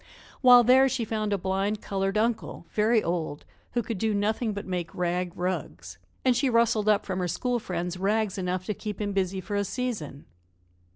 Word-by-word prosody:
While 245 -2 +8
there 260 +3 +6
she 250 -3 -1
found 215 -1 -2
a 200 - +2
blind 195 +3 -1
colored 195 0 -2
uncle, 225 +1 -1
very 220 +1 +3
old, 165 -4 -3 0.3
who 240 - 0
could 220 -3 -4
do 220 0 +1
nothing 215 +3 0
but 205 0 -5
make 180 -3 -4
rag 180 0 -1
rugs, 90 - -4 0.3
and 255 -1 +4
she 265 +2 +2
rustled 230 -3 +3
up 210 -1 +3
from 185 -1 -3
her 180 - 0
school 245 +8 -1
friends 180 -3 -4
rags 205 +1 0
enough 185 0 -2
to 210 - -1
keep 210 0 -6
him 205 -1 -2
busy 190 -1 0
for 205 +2 -5
a 200 - +1
season. 205 - -4
205 Hz, 190 wpm, -27 LUFS, 180-225 Hz, 0.3 s, While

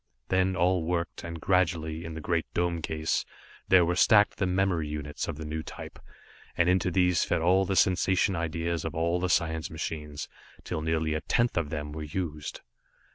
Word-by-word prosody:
Then 95 0 +2
all 90 0 +2
worked, 85 0 -2
and 85 0 -6
gradually, 85 -3 0
in 80 -1 -6
the 80 - -6
great 85 +1 -1
dome 85 -1 0
case, 80 0 -1 0.4
there 90 -2 +6
were 90 +1 0
stacked 105 +3 +5
the 95 - 0
memory 90 -4 +1
units 75 -1 -4
of - - -4
the 80 - -6
new 80 +1 -3
type, - - -9 0.6
and 85 - +3
into 90 0 +3
these 90 0 +3
fed - - 0
all 95 +3 +4
the 95 - -1
sensation 95 +2 +3
ideas 85 0 -2
of 80 - -4
all 85 +2 +1
the 90 0 -1
science 80 -2 +1
machines, 75 -2 -5 0.4
till 80 - -3
nearly 80 0 0
a 80 - -2
tenth 120 0 +1
of 85 -4 0
them 75 -1 -4
were 75 +1 -6
used. 75 -1 -4
85 Hz, 185 wpm, -28 LUFS, 80-90 Hz, 0.6 s, there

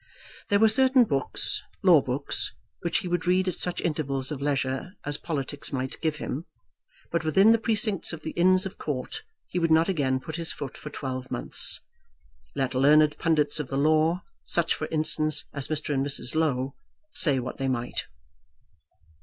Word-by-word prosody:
There 205 - +4
were 220 +2 +6
certain 260 +3 +5
books, 140 - 0 0.2
law 175 -6 +7
books, 130 +3 -1 0.3
which 170 - 0
he 195 - -3
would 175 0 -1
read 185 +1 +3
at 185 - 0
such 180 - -3
intervals 140 -4 -2
of 145 -2 -5
leisure 140 +3 -1
as 145 0 -2
politics 145 -3 -4
might 130 -1 -4
give 160 -2 0
him; 155 +1 -5 0.7
but 170 -1 0
within 190 +8 +5
the 230 - +4
precincts 215 -3 +1
of 160 -1 -8
the 160 - -4
Inns 185 +2 +3
of 195 - -7
Court 135 -4 -4 0.3
he 180 - -2
would 165 -1 +1
not 160 +3 +4
again 135 -7 +1
put 160 +4 -7
his 165 -1 -1
foot 135 -2 -7
for 150 - -8
twelve 130 -3 -5
months, - - -1 0.7
let 135 -2 -1
learned 150 +3 +5
pundits 150 -2 +2
of 150 - -3
the 135 - -3
law, 155 +4 +2 0.2
such 170 -1 +1
for 155 - -4
instance 155 -1 0
as 140 -2 -3
Mr. 150 -1 -2
and 135 -1 +1
Mrs. 135 -3 -1
Low, 135 -4 0 0.4
say 145 -5 +6
what 125 +2 -5
they 135 - -1
might. 120 -2 -2
155 Hz, 180 wpm, -26 LUFS, 135-175 Hz, 0.7 s, law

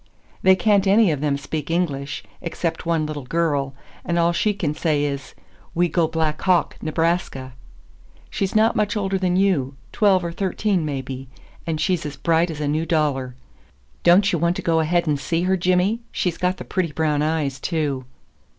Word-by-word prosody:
"They 190 0 +6
can't 200 -1 +2
any 200 -1 +5
of 145 -2 -2
them 145 -2 +1
speak 145 +2 -5
English, 145 -5 -2 0.2
except 165 0 -3
one 165 -2 +1
little 150 -1 -4
girl, 145 -3 0 0.3
and 175 - -1
all 170 0 +3
she 210 +5 +1
can 170 -7 -2
say 150 -2 0
is 140 -2 -4 0.4
'We 175 +1 +2
go 165 0 +2
Black 160 -1 -1
Hawk, 180 -4 +2
Nebraska.' 160 -5 -1 0.7
She's 195 0 -3
not 220 +2 +4
much 210 0 0
older 195 -1 -1
than 180 -1 +1
you, 175 -9 +1 0.2
twelve 190 -4 +3
or 170 - -3
thirteen, 190 0 0
maybe, 135 -2 -5 0.4
and 160 -2 -1
she's 180 +1 0
as 145 -2 -6
bright 165 +4 +2
as 155 -2 -6
a 150 - -1
new 155 +3 0
dollar. 135 -6 0 0.7
Don't 190 +4 +5
you 170 - +1
want 170 +2 +1
to - - -5
go 165 -1 +2
ahead 170 +2 +1
and 150 -3 0
see 165 +5 -1
her, 190 +1 +2
Jimmy? 185 +4 +1
She's 175 -3 -2
got 180 +1 0
the - - -8
pretty 180 -4 -1
brown 150 -1 0
eyes, 150 -4 -1
too!" 145 -5 -2
165 Hz, 185 wpm, -22 LUFS, 150-180 Hz, 0.7 s, They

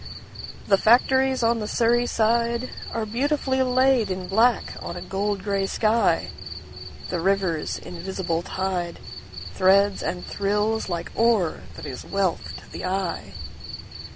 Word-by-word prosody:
The 195 -1 +4
factories 260 +2 +4
on 230 0 +2
the 210 - -3
Surrey 240 +2 +2
sideAre 235 0 -1
beautifully 265 +1 0
laid 255 -2 +3
in 185 -1 -3
black 230 +4 +2
on 170 - -5
a 175 - -6
gold 200 0 -2
grey 200 -2 0
sky. 220 +3 +2 0.8
The 180 - -1
river's 185 -3 0
invisible 175 -1 -3
tideThreads 185 - 0
and 180 - -3
thrills 210 +2 -1
like 170 -1 -4
ore 225 -8 +2 0.2
that - - -8
is 130 - -6
wealth 195 -3 -2
to - - -15
the - - -7
eye. 185 -1 -3
200 Hz, 125 wpm, -24 LUFS, 185-235 Hz, 0.8 s, The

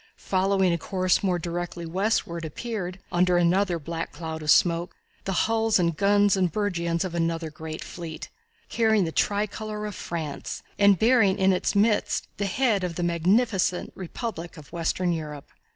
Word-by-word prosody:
Following 190 -1 +1
a 170 - -1
course 185 +2 +1
more 185 -3 +1
directly 175 0 -4
westward 170 -1 -1
appeared, 185 +2 -4
under 180 0 +3
another 175 +1 +2
black 165 +1 -5
cloud 160 0 -6
of 150 - -5
smoke, 170 +3 +3 0.3
the 195 - -1
hulls 225 0 +2
and 170 -3 +1
guns 205 +2 +4
and 185 -3 +1
burgeons 170 -3 -1
of 180 - -5
another 165 -1 -1
great 155 +1 -7
fleet, 165 -3 -7 0.4
carrying 220 -3 +2
the 160 - -3
tri 205 +5 +1
color 210 0 -6
of 210 - -4
France, 160 -5 -5 0.2
and 200 -1 +6
bearing 220 -2 +4
in 190 -1 +4
its 180 - -1
midst 210 +1 +2
the 200 - -1
head 215 -2 +1
of 175 -2 -3
the 175 - -2
magnificent 180 +3 +1
republic 180 -2 -6
of 150 - -13
western 175 +2 0
Europe. 150 -3 -6
180 Hz, 165 wpm, -26 LUFS, 170-205 Hz, 0.4 s, and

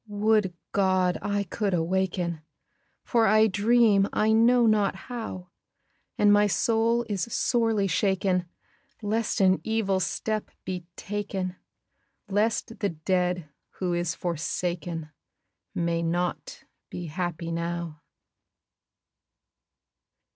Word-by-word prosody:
Would 210 -3 +1 0.2
God 185 -2 +2
I 205 0 -1
could 200 0 -1
awaken! 175 -1 -1 0.6
For 230 -2 +2
I 215 +1 +5
dream 210 -1 +4
I 215 +1 +2
know 235 +2 +5
not 210 -3 +3
how! 190 -5 -7 0.7
And 205 0 +5
my 205 0 +5
soul 230 +3 +1
is 200 -4 -1
sorely 225 -5 +1
shaken 190 -1 +1 0.6
Lest 220 +2 0
an 190 -1 +4
evil 220 -4 0
step 215 +4 -2 0.2
be 180 -2 -5
taken, 195 -3 -4 0.7
Lest 215 +3 0
the 200 - 0
dead 180 0 -1 0.3
who 180 -2 -2
is 175 -1 -1
forsaken 170 -1 -3 0.6
May 170 -1 0
not 175 +1 -2 0.3
be 175 - -6
happy 170 0 -4
now. 170 -2 -4
190 Hz, 105 wpm, -27 LUFS, 175-215 Hz, 0.7 s, I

